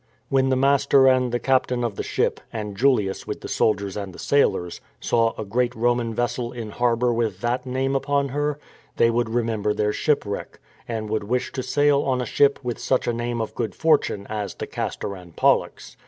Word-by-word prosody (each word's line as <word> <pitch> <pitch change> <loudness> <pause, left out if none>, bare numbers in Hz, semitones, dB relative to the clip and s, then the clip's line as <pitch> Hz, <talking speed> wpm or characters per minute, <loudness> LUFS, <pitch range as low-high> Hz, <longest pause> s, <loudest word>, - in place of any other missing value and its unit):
^ - - -41 0.3
When 135 -1 +2
the 130 - +3
master 140 0 +4
and 130 -1 +3
the 120 - +1
captain 125 -1 +1
of 115 -4 -2
the - - -3
ship, - - -1
and 105 -3 -5
Julius 110 -5 +1
with - - -5
the - - -6
soldiers 100 -3 0
and 100 -3 -5
the - - -11
sailors, 90 -11 +1 0.2
saw 115 -1 +1
a 110 - -3
great 120 +4 0
Roman 120 0 +1
vessel 120 0 -1
in 115 -4 -6
harbour 120 +1 +1
with 110 -5 -1
that 120 +2 -1
name 135 +2 -1
upon 140 0 0
her, 145 +2 -1 0.4
they 115 0 +4
would 120 -1 0
remember 110 -3 0
their 105 0 0
shipwreck, 125 -10 -1 0.3
and 110 -2 -3
would 110 -2 -1
wish 125 +4 -1
to 130 - -3
sail 145 +1 +2
on 130 -2 0
a 125 - -1
ship 140 +4 +3
with 120 -1 -3
such 130 - +1
a 120 - 0
name 120 0 -2
of 110 - -3
good 110 -6 -3
fortune 150 -10 +2
as 105 -2 -4
the - - -5
Castor 100 - -4
and 90 -3 -13
Pollux. - - +1
120 Hz, 205 wpm, -23 LUFS, 110-130 Hz, 0.4 s, master